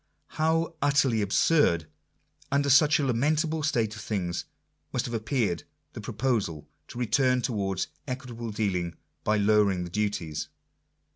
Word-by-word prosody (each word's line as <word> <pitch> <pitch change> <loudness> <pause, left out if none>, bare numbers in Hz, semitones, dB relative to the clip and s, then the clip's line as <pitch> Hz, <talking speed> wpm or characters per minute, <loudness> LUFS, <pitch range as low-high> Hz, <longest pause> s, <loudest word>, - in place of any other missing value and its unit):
How 165 +2 +1
utterly 140 -5 +3
absurd, 100 - +3 0.7
under 140 0 +2
such 150 +3 +6
a 145 - +1
lamentable 155 +6 +1
state 115 -8 0
of 105 - -8
things, 90 -5 -2 0.5
must - - -1
have 120 - -5
appeared 110 -6 0 0.3
the - - -7
proposal 105 - -1 0.2
to - - -10
return 125 +1 +2
towards 100 -6 -1 0.2
equit 130 -1 -5
able 115 0 -5
dealing 90 -6 -1 0.3
by 105 0 +2
lowering 100 -3 +3
the 85 - -7
duties 90 -7 -2
115 Hz, 135 wpm, -27 LUFS, 100-140 Hz, 0.7 s, such